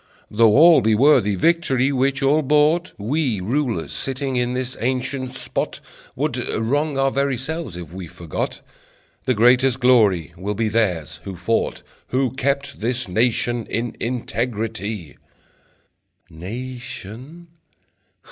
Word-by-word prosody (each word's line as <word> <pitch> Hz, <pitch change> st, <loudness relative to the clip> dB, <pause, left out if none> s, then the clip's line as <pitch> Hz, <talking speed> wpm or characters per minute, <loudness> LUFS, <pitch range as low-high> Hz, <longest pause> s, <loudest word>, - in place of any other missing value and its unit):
Though 110 Hz, +1 st, +5 dB
all 165 Hz, +1 st, +8 dB
be 110 Hz, 0 st, +3 dB
worthy 110 Hz, -5 st, +4 dB
Victory 140 Hz, -, +2 dB
which 135 Hz, +1 st, 0 dB
all 145 Hz, +3 st, +4 dB
bought, 150 Hz, +4 st, +2 dB
We 125 Hz, +1 st, -1 dB
rulers 115 Hz, -, -1 dB
sitting 135 Hz, 0 st, -3 dB
in 125 Hz, 0 st, 0 dB
this 130 Hz, 0 st, -3 dB
ancient 130 Hz, +1 st, -2 dB
spot -, -, -3 dB, 0.4 s
Would -, -, -1 dB, 0.2 s
wrong 140 Hz, +6 st, 0 dB
our 135 Hz, 0 st, +2 dB
very 140 Hz, -1 st, 0 dB
selves 155 Hz, -, -5 dB
if 85 Hz, -2 st, -9 dB
we 95 Hz, -2 st, -7 dB
forgot 80 Hz, 0 st, -5 dB, 0.6 s
The 130 Hz, -, +2 dB
greatest 125 Hz, +3 st, +4 dB
glory 105 Hz, -, +3 dB
will 100 Hz, +4 st, -4 dB
be 110 Hz, +1 st, 0 dB
theirs 90 Hz, -8 st, -1 dB
who 95 Hz, -2 st, -6 dB
fought, 95 Hz, +6 st, -1 dB, 0.2 s
Who 130 Hz, 0 st, 0 dB
kept 140 Hz, +1 st, -2 dB
this 120 Hz, +1 st, -1 dB
nation 120 Hz, +3 st, +1 dB
in 115 Hz, 0 st, -3 dB
integrity." 110 Hz, -, -3 dB, 1.1 s
Nation? 125 Hz, -, -8 dB
125 Hz, 125 wpm, -21 LUFS, 105-135 Hz, 1.1 s, all